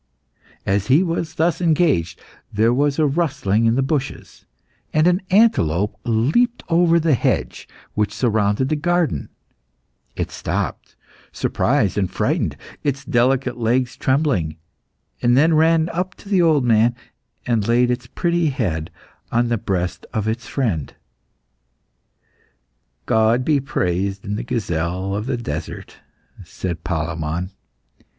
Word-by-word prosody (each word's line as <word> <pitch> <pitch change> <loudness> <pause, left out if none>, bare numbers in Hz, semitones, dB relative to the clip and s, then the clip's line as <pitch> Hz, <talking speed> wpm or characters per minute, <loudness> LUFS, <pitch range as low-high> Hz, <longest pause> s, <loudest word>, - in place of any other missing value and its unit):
As 100 +1 0
he 140 +8 +5
was 165 -2 -3
thus 165 +1 +1
engaged, 155 - +2 0.3
there 110 +3 +2
was 140 +2 +1
a 155 - +3
rustling 135 - +1
in 115 - +3
the 135 - +2
bushes, 135 -1 -4 0.4
and 155 +1 +3
an 180 +2 +3
antelope 105 - +3
leaped 140 - +1
over 170 0 +4
the 160 -2 +2
hedge 125 - -1 0.3
which 105 -1 0
surrounded 105 +2 +1
the 155 - +1
garden; 170 - 0 0.9
it - - -3
stopped, - - -4 0.4
surprised - - 0
and - - 0
frightened, - - -1 0.3
its 140 -1 -2
delicate 125 +1 +1
legs 120 +2 +1
trembling, 130 - 0 0.7
then 135 +7 +4
ran 160 +1 +4
up 180 +2 -3
to - - -16
the 190 -3 +3
old 155 -6 +3
man, 115 +1 +3 0.5
and 115 -4 0
laid 120 +1 +3
its 125 0 -3
pretty 170 +4 0
head 90 - -2 0.4
on 120 +1 +1
the 120 - +1
breast 90 -2 -3
of 110 -1 -1
its 115 +2 -3
friend. 100 - -2 2.1
"God 110 +3 +2
be 150 -3 +3
praised 95 -6 -2
in 100 - -3
the 110 - -3
gazelle 95 -5 -2
of 105 +4 -3
the 130 -2 -1
desert," 80 -9 -6 0.5
said 90 -3 -5
Palemon. 85 +1 -3
120 Hz, 130 wpm, -21 LUFS, 100-155 Hz, 2.1 s, he